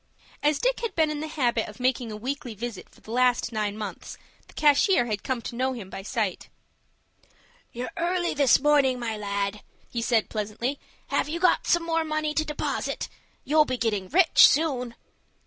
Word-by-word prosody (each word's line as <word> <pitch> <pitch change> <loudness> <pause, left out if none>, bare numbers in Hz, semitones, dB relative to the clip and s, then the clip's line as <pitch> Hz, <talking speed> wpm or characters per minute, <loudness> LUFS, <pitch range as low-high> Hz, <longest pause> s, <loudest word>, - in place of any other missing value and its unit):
As 295 0 +2
Dick - - 0
had 465 - -4
been 315 -2 +2
in 300 - -3
the 310 - -4
habit 245 -7 0
of 210 - -13
making 250 -2 0
a 210 - -6
weekly 250 0 -5
visit 225 -2 -6
for - - -22
the 220 - -11
last 245 0 +2
nine 210 -2 -2
months, 205 -4 -7 0.3
the - - -19
cashier 295 - +4
had 210 -4 -3
come 255 -3 -3
to - - -6
know 260 +2 0
him 210 -7 -8
by - - -6
sight. 210 -2 -3 1.2
"You're 245 +1 -5
early, 350 +1 0
this 280 -3 +4
morning, 280 -3 +3
my 230 -2 -3
lad," 200 0 -3 0.3
he 235 - -2
said, 230 -2 +2
pleasantly. 220 +6 -3 0.3
"Have - - 0
you 335 +2 -3
got 365 - +3
some 345 -1 +3
more 330 -1 0
money 310 -1 -1
to 310 - +1
deposit? 300 -1 -3 0.3
You'll 305 +1 +4
be 255 -2 -2
getting 210 -5 -1
rich, 345 +1 +7
soon." 260 -6 0
255 Hz, 185 wpm, -26 LUFS, 220-305 Hz, 1.2 s, rich